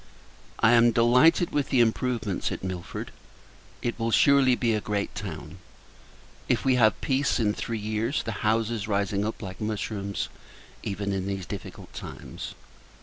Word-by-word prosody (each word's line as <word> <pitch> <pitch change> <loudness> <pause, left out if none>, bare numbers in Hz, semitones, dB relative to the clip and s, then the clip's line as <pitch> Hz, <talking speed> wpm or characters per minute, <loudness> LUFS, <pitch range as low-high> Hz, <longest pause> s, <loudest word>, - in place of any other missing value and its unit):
I 115 - +5
am 120 0 +6
delighted 125 +10 +4
with 145 -2 0
the 130 - +3
improvements 115 -3 +1
at - - -5
Milford. 90 -2 -5 0.7
It 120 0 -2
will 115 0 0
surely 135 +1 +5
be 120 -2 +1
a 105 - 0
great 100 -1 -2
town, - - -7 0.9
if - - +1
we 130 - +4
have 110 -5 +4
peace, 135 0 +1
in 105 -2 +2
three 115 +1 -3
years; 110 +5 -1
the 115 - -3
houses 110 0 0
rising 100 -1 0
up, 110 +1 -4
like 95 +1 -7
mushrooms, 105 -2 -2 0.5
even 100 0 -3
in 95 0 -2
these 95 -2 -3
difficult - - -8
times. - - -8
110 Hz, 150 wpm, -27 LUFS, 100-120 Hz, 0.9 s, am